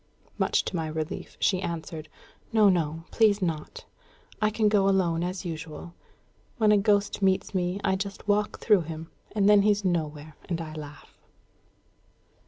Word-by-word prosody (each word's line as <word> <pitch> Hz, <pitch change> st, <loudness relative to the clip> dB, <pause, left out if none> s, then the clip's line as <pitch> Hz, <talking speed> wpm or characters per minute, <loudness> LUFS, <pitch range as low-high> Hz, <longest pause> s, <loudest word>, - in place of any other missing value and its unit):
Much -, -, +2 dB
to -, -, -4 dB
my 160 Hz, -2 st, -1 dB
relief, 155 Hz, 0 st, -5 dB
she 185 Hz, -2 st, +2 dB
answered, 165 Hz, -2 st, -5 dB, 0.4 s
"No, 215 Hz, -2 st, +5 dB
no; 165 Hz, -3 st, 0 dB
please 215 Hz, -3 st, +4 dB
not. 170 Hz, -, -4 dB, 0.6 s
I 215 Hz, -, +4 dB
can 215 Hz, 0 st, +1 dB
go 200 Hz, -2 st, +3 dB
alone 175 Hz, -4 st, +1 dB
as 180 Hz, 0 st, -4 dB
usual. 165 Hz, 0 st, -7 dB, 0.6 s
When 215 Hz, -3 st, +4 dB
a 210 Hz, -, +6 dB
ghost 205 Hz, 0 st, +1 dB
meets 190 Hz, +1 st, +1 dB
me, 180 Hz, +1 st, -1 dB
I 190 Hz, -, +2 dB
just 200 Hz, +1 st, -6 dB
walk 210 Hz, +1 st, +1 dB
through 210 Hz, -5 st, +4 dB
him, 160 Hz, 0 st, -7 dB, 0.2 s
and 200 Hz, -2 st, +3 dB
then 205 Hz, -1 st, +7 dB
he's 205 Hz, 0 st, +2 dB
nowhere; 155 Hz, -3 st, -2 dB
and 170 Hz, -2 st, -1 dB
I 160 Hz, -2 st, -6 dB
laugh." 150 Hz, -2 st, -10 dB
185 Hz, 160 wpm, -27 LUFS, 160-205 Hz, 0.6 s, then